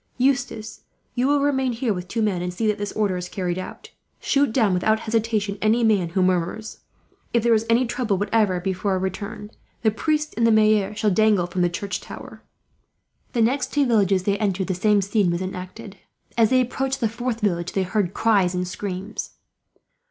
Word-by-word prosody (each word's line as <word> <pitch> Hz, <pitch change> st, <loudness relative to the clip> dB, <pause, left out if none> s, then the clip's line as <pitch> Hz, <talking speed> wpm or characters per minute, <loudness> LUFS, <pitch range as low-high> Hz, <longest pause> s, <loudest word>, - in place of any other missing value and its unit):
"Eustace, 250 Hz, -4 st, -1 dB, 0.3 s
you 250 Hz, +1 st, +1 dB
will 285 Hz, 0 st, +3 dB
remain 265 Hz, -3 st, +1 dB
here 230 Hz, -1 st, -1 dB
with 180 Hz, -1 st, -6 dB
two 225 Hz, +4 st, -1 dB
men, 195 Hz, -5 st, 0 dB
and 180 Hz, 0 st, -2 dB
see 185 Hz, +6 st, -3 dB
that 210 Hz, -1 st, +1 dB
this 205 Hz, 0 st, -3 dB
order 200 Hz, -4 st, 0 dB
is 180 Hz, 0 st, -5 dB
carried 180 Hz, -2 st, -2 dB
out. 185 Hz, -, -9 dB, 0.3 s
Shoot 280 Hz, -3 st, +2 dB
down 220 Hz, -5 st, +2 dB
without 215 Hz, +5 st, +2 dB
hesitation 220 Hz, -3 st, -1 dB
any 225 Hz, +3 st, +3 dB
man 205 Hz, -6 st, +3 dB
who 185 Hz, +2 st, +1 dB
murmurs. 185 Hz, +4 st, -1 dB, 0.5 s
If 235 Hz, -2 st, +2 dB
there 235 Hz, -1 st, +4 dB
is 225 Hz, 0 st, +1 dB
any 235 Hz, +2 st, +4 dB
trouble 235 Hz, -4 st, -1 dB
whatever, 205 Hz, -2 st, +1 dB
before 190 Hz, +2 st, -1 dB
our -, -, +1 dB
return, 205 Hz, +3 st, -5 dB, 0.3 s
the 220 Hz, -, +4 dB
priest 305 Hz, +6 st, -1 dB
and 230 Hz, 0 st, +3 dB
the -, -, +4 dB
maire 215 Hz, -2 st, +3 dB
shall 215 Hz, -1 st, +1 dB
dangle 210 Hz, -2 st, +3 dB
from 175 Hz, +1 st, -3 dB
the 175 Hz, -, +3 dB
church 185 Hz, +2 st, -4 dB
tower." -, -, -10 dB, 0.9 s
The 235 Hz, -3 st, +3 dB
next 265 Hz, +5 st, 0 dB
two 290 Hz, -1 st, +3 dB
villages 200 Hz, -6 st, +2 dB
they 200 Hz, +1 st, 0 dB
entered, 195 Hz, -3 st, 0 dB
the 190 Hz, -, -1 dB
same 205 Hz, +2 st, +2 dB
scene 200 Hz, -1 st, +1 dB
was 170 Hz, +1 st, -1 dB
enacted. 190 Hz, +3 st, -7 dB, 0.4 s
As 225 Hz, -2 st, +4 dB
they 255 Hz, 0 st, +4 dB
approached 265 Hz, +2 st, -2 dB
the 230 Hz, -, +2 dB
fourth 235 Hz, +1 st, -3 dB
village, 175 Hz, -4 st, -1 dB
they 195 Hz, -, +1 dB
heard 190 Hz, -1 st, -1 dB
cries 195 Hz, -5 st, +2 dB
and 180 Hz, 0 st, -1 dB
screams. 195 Hz, +2 st, -5 dB
210 Hz, 195 wpm, -23 LUFS, 185-230 Hz, 0.9 s, there